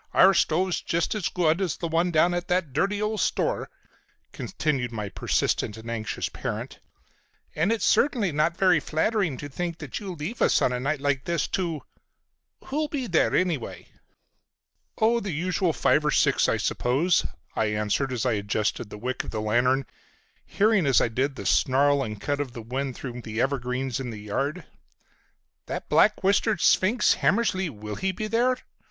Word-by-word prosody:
Our 195 +1 +7
stove's 180 +1 +1
just 170 0 -1
as 210 -5 -1
good 170 0 +1
as 180 -6 -1
the 170 - -3
one 165 +2 +1
down 170 +1 +3
at 175 0 -3
that 180 -6 0
dirty 200 +8 0
old 210 0 -1
store," - - 0 0.6
continued 135 -6 -2
my 105 -3 -4
persistent 105 +2 -1
and 115 +1 -7
anxious 110 -2 -3
parent, - - -5 0.7
"and 165 +7 +1
it's 230 -3 0
certainly 235 - +2
not 155 +3 +1
very 185 -4 +4
flattering 160 - 0
to 145 - -6
think 170 +4 -4
that 145 -4 -6
you 195 -4 -6
leave 170 +10 -6
us - - +4
on 125 - +1
a 125 - -2
night 140 +2 -1
like 140 -2 0
this 170 -3 0
to—Who'll 185 - -6
be 285 -4 -3
there, 175 -8 +2
anyway?" 170 -9 -2 1.1
"Oh, 230 +2 +3
the 205 - -5
usual 180 +3 0
five 155 0 +2
or 150 - +1
six - - +3
I - - +2
suppose," 150 +9 +1 0.3
I 110 - +1
answered 105 +5 -1
as 125 -2 -2
I 125 - +2
adjusted 105 +1 -1
the 105 - -8
wick 125 +4 -3
of - - -7
my 110 - -4
lantern, 120 +5 +2 0.6
hearing 205 -6 +2
as 135 - +5
I - - +1
did 130 +4 -1
the 100 - -7
snarl 140 +7 +3
and 105 -5 -4
cut 145 +6 -2
of 135 -4 -3
the 115 - -8
wind 130 +3 -3
through 125 -2 -7
the 110 -1 -5
evergreens 130 -1 -1
in 130 -2 -4
the 110 -3 -7
yard. 140 - -3 1.0
"That - - -5
black 210 -1 +4
whiskered 200 +1 +2
sphinx, 210 +7 +4
Hammersly, 190 -4 +1
will 105 -5 -7
he 190 0 0
be 215 +4 -4
there?" 240 +4 +2
150 Hz, 175 wpm, -26 LUFS, 125-185 Hz, 1.1 s, Our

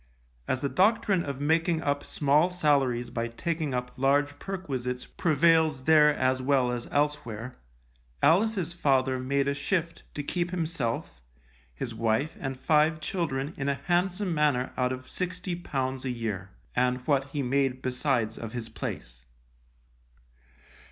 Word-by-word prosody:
As 130 - 0
the 140 - +1
doctrine 195 -1 +3
of 140 -2 -5
making 160 +2 +1
up 145 0 0
small 150 +4 +2
salaries 140 -8 +1
by 115 0 -2
taking 155 +3 -2
up 125 0 -4
large 145 +2 +2
perquisites 130 -10 -4
prevails 160 -3 +2
there 150 0 +6
as 130 0 +1
well 130 -2 +2
as 120 -1 -3
elsewhere, 145 -5 -2 0.6
Alice's 185 - +3
father 135 -5 +2
made 140 +2 0
a 140 - +2
shift 165 +3 -2
to 145 - -3
keep 175 +4 -1
himself, 155 - -3 0.5
his 115 - -4
wife 115 +6 0
and 135 -1 -4
five 155 +3 +3
children 155 -3 -2
in 140 0 -1
a 140 - +1
handsome 180 +6 0
manner 145 -5 +1
out 125 0 +1
of 130 0 -5
£60 175 -8 -3
a 130 - -2
year, 110 -6 -3 0.3
and 125 0 +1
what 140 -3 +2
he 140 0 -3
made 130 0 0
besides 125 -3 0
of 115 -1 -6
his 120 -2 -5
place. - - -6
140 Hz, 140 wpm, -28 LUFS, 125-160 Hz, 0.6 s, there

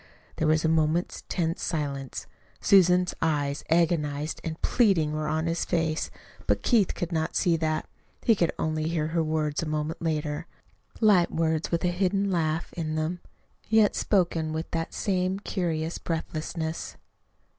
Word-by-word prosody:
There - - +1
was 155 +1 +3
a - - +4
moment's 160 +2 +1
tense 165 -2 -1
silence. 140 -4 -3 0.3
Susan's 180 -2 +5
eyes, 145 -3 0
agonized 155 -3 +1
and 160 0 -4
pleading, 185 -11 +3
were 155 0 -2
on 155 +1 0
his 165 0 0
face. 160 -2 0 0.4
But - - +1
Keith 220 -7 +3
could 175 0 -3
not 160 -1 -1
see 175 -4 +3
that. 155 -1 -1 0.4
He 230 - +5
could 175 -5 +1
only 155 0 -1
hear 160 -2 -1
her 165 0 +1
words 155 -1 -1
a 165 - -3
moment 155 +1 -2
later 155 0 -2 0.5
light 200 -6 +5
words, 160 -1 0
with 170 0 0
a - - +3
hidden 195 +2 +1
laugh 160 -2 -1
in 155 -2 -3
them, 160 +3 -1 0.5
yet 220 -1 +4
spoken 170 -5 +1
with 160 +1 -4
that 165 -1 -2
same 185 -1 0
curious 170 -5 -2
breathlessness. 160 0 -4
160 Hz, 155 wpm, -27 LUFS, 155-175 Hz, 0.5 s, Susan's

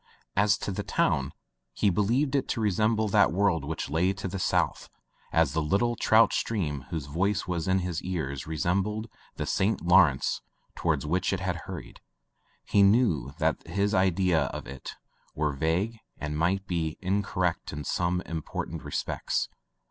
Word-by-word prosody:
As 100 +1 +4
to - - -4
the 95 - -3
town - - 0 0.4
he 100 +9 +2
believed 120 - +1
it 140 - +1
to - - -2
resemble 110 +1 +2
that 100 0 +4
world 90 -4 +2
which 80 +2 -3
lay 85 +7 +1
to 95 0 -5
the 95 +1 -4
south - - 0 0.4
as 80 -4 +3
the 80 - +1
little 100 +10 +1
trout 115 0 +4
stream 75 - -2
whose 80 -5 -3
voice 95 +8 0
was 85 -2 -2
in 95 0 +3
his 85 -3 -2
ears 75 -7 -3
re 80 0 -4
sembled 100 +6 0 0.3
the - - -3
St. 100 +2 +1
Lawrence 85 -6 +4 0.3
toward - - 0
which 90 +5 0
it 95 -1 -1
hurried. 90 -1 -5 0.6
He 100 - +3
knew 100 - +3
that 80 -2 +1
his 100 +5 0
ideas 90 -6 +2
of - - -6
it 65 0 -8 0.4
were 75 -1 0
vague 85 +11 0 0.2
and 75 0 -4
might 90 +5 +1
be 80 -4 -2
incorrect 95 -2 -1
in 75 0 -5
some 90 +5 0
im 80 -1 -4
portant - - -5
respects. - - -2
90 Hz, 165 wpm, -28 LUFS, 80-100 Hz, 0.6 s, As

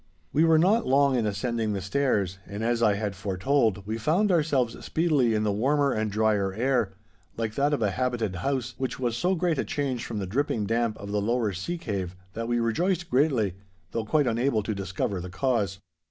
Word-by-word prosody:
We 155 - +4
were 165 -1 +5
not 200 +8 +3
long 140 0 +4
in 115 -3 +1
ascending 110 +1 -1
the 100 - -2
stairs, 100 -3 0
and, 100 +3 -5
as 120 0 +1
I 105 -3 +4
had 100 -1 -3
foretold, 100 +2 0
we 110 +2 -3
found 180 - +2
ourselves 145 -8 +1
speedily 145 -9 +2
in 105 - +1
the 105 - +1
warmer 140 +7 +2
and 110 -2 -1
drier 105 -2 +1
air, 115 -3 +1 0.4
like 110 -1 -2
that 140 +4 +1
of 145 -6 0
a 100 - +2
habited 115 -5 -1
house, 130 +3 -2
which 130 -1 -2
was 120 -3 -1
so 180 +9 +1
great 170 -4 0
a - - +1
change 135 -5 -2
from 115 - -5
the 100 - -2
dripping 110 +1 -1
damp 115 +1 0
of 100 0 -7
the 105 0 0
lower 115 -1 0
sea 95 - -3
cave 95 - -4 0.2
that 115 +1 -4
we 120 0 +1
rejoiced 170 - 0
greatly, 125 - +2 0.4
though 115 - -2
quite 145 +6 +2
unable 115 -1 +1
to 110 - -2
discover 95 -1 -3
the 90 - -6
cause. 100 0 0
115 Hz, 205 wpm, -27 LUFS, 105-140 Hz, 0.4 s, were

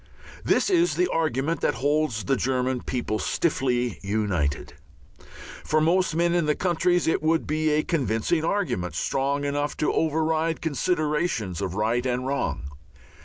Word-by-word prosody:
This - - +2
is 350 -1 +3
the 360 - +2
argument 155 0 0
that - - +1
holds 145 -3 0
the 135 - +1
German 125 0 0
people 120 -4 -2
stiffly 125 -7 0
united. 100 -8 -1 0.9
For 155 - +1
most 170 +1 +2
men 170 +1 +2
in 170 -3 +1
most 150 - +1
countries 175 0 +1
it 160 - +1
would 160 +1 +1
be 155 +1 0
a 150 0 +2
convincing 150 +1 0
argument, 130 - -1
strong 140 +9 -1
enough 145 +1 -2
to 150 - 0
override 160 +1 0
considerations 150 - -1
of 95 -2 -3
right 115 +4 +1
and 125 0 -1
wrong. 130 - -2
145 Hz, 145 wpm, -25 LUFS, 120-160 Hz, 0.9 s, is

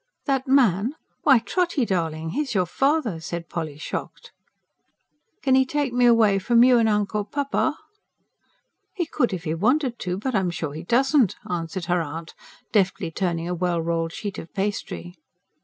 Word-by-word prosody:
"That 270 -2 0
man? 245 - +3 0.3
Why, 275 -4 +6
Trotty 315 +3 0
darling, 160 -4 -2
he's 285 - -2
your 185 -2 +3
father!" 270 - 0
said 170 +1 -6
Polly, 155 -4 -4
shocked. 155 - -6 1.1
"Kin 265 -2 +4
'e 265 - +5
take 280 -1 -2
me 245 0 +4
away 225 -4 +5
f'om 235 +4 +5
you 250 -2 +6
and 225 -1 +3
Uncle 210 0 0
Papa?" 285 +6 -1 1.2
"He 355 -4 -1
could 245 -6 0
if 180 -3 -4
he 155 -1 -2
wanted 245 - +1
to. 180 0 -3
But 255 +6 -3
I'm 190 -4 +1
sure 160 -4 -4
he 155 - -6
doesn't," 255 - +3
answered 170 0 -3
her 175 0 +1
aunt, 160 +2 -6 0.4
deftly 190 -5 +1
turning 170 -1 -2
a 180 - -2
well 175 -1 0
rolled 165 0 -1
sheet 200 +3 -5
of 165 - -10
pastry. 195 -3 -3
200 Hz, 165 wpm, -24 LUFS, 170-260 Hz, 1.2 s, Why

